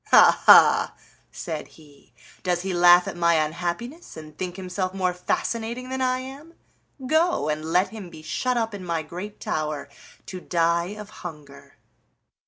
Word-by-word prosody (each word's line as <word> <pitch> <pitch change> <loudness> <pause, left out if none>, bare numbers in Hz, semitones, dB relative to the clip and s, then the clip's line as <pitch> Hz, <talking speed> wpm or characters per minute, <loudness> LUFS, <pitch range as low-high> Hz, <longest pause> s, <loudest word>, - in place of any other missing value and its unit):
"Ha, - - +6
ha!" - - +7 0.4
said 160 -3 -6
he; 145 -5 -20 0.3
"does 180 -1 -1
he 190 -1 -2
laugh 175 0 +6
at - - -5
my 170 -1 +3
unhappiness, 175 - -3
and 155 -1 -11
think 180 +1 -5
himself 185 0 -4
more 185 -2 0
fascinating 230 +7 -3
than 260 0 -3
I 255 0 +1
am? 280 +6 -11 0.5
Go, 315 - +1
and 155 0 -2
let 180 +4 +2
him 210 -5 -9
be 155 -2 -13
shut 250 +10 -1
up 225 -2 -1
in 200 -2 -7
my 170 -2 -2
great 180 +7 -8
tower 155 -2 -3 0.4
to 185 -1 -8
die 170 +3 0
of 210 -1 -10
hunger." 150 -5 -11
180 Hz, 160 wpm, -24 LUFS, 165-225 Hz, 0.5 s, ha